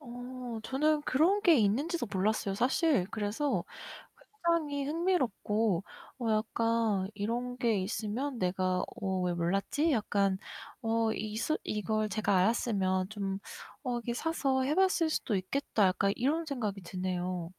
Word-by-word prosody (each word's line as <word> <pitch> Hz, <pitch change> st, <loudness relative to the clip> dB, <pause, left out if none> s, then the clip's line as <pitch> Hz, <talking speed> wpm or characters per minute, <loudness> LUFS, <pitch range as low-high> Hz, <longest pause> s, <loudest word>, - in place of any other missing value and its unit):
어 245 Hz, -2 st, -7 dB
저는 295 Hz, +5 st, +1 dB
그런 360 Hz, +11 st, +3 dB
게 335 Hz, -4 st, +6 dB
있는지도 250 Hz, -, +1 dB
몰랐어요. 200 Hz, 0 st, 0 dB
사실. 255 Hz, -, +2 dB
그래서 225 Hz, +7 st, -1 dB, 0.8 s
굉장히 295 Hz, -5 st, +1 dB
흥미롭고 230 Hz, -, +1 dB, 0.4 s
어 240 Hz, -, -3 dB
약간 220 Hz, -2 st, +1 dB
이런 240 Hz, +4 st, -3 dB
게 230 Hz, -5 st, +2 dB
있으면 230 Hz, +6 st, -3 dB
'내가 185 Hz, -1 st, +1 dB, 0.2 s
어 190 Hz, -2 st, 0 dB
왜 180 Hz, -1 st, +1 dB
몰랐지?' 195 Hz, -, +1 dB
약간 200 Hz, -4 st, +1 dB, 0.4 s
어 225 Hz, -1 st, +1 dB
이스 220 Hz, +8 st, -1 dB
이걸 215 Hz, +1 st, -1 dB
제가 200 Hz, -1 st, +1 dB
알았으면 190 Hz, -2 st, +1 dB
좀 195 Hz, -2 st, -3 dB, 0.4 s
'어 250 Hz, -3 st, -1 dB
이렇게 235 Hz, 0 st, -3 dB
사서 270 Hz, -3 st, 0 dB
해 290 Hz, +3 st, +1 dB
봤을 370 Hz, -3 st, +3 dB
수도 230 Hz, -8 st, -1 dB
있겠다.' 205 Hz, +1 st, +1 dB
약간 195 Hz, +2 st, +2 dB
이런 310 Hz, +7 st, 0 dB
생각이 215 Hz, -9 st, -3 dB
드네요. 180 Hz, -1 st, -3 dB
225 Hz, 275 characters per minute, -31 LUFS, 195-275 Hz, 0.8 s, 게